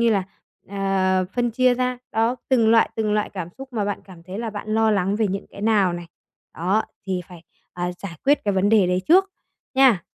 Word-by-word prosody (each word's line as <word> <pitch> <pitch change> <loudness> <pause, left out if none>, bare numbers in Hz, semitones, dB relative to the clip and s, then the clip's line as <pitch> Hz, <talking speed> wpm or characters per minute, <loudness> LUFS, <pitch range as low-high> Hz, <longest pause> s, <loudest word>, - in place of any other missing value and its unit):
như 235 -1 +4
là, 200 -3 +2 0.5
ờ, 190 -1 +1
phân 240 -1 0
chia 250 +2 +3
ra, 250 0 -1
đó, 225 +3 +1
từng 230 -4 +4
loại, 225 0 +4
từng 215 -1 0
loại 210 0 0
cảm 180 -4 -5
xúc 270 -1 -10
mà 210 -3 -1
bạn 205 - -3
cảm 180 -4 -14
thấy 185 +4 -7
là 230 -1 -3
bạn 210 0 -7
lo 220 0 +3
lắng 195 0 +1
về 220 -1 +1
những 195 +1 -4
cái 200 - -11
nào 205 -5 +3
này. 175 0 -6 0.5
Đó, 190 +6 +1 0.2
thì 185 -1 -1
phải, 175 -2 -13 0.3
ờ, 175 0 -3
giải 190 -4 -7
quyết 285 -2 +3
cái 200 -1 +1
vấn 190 +2 +2
đề 210 -4 +5
đấy 180 +1 0
trước, 380 +3 +5 0.4
nha. 255 -10 +5
205 Hz, 225 wpm, -23 LUFS, 185-230 Hz, 0.5 s, đề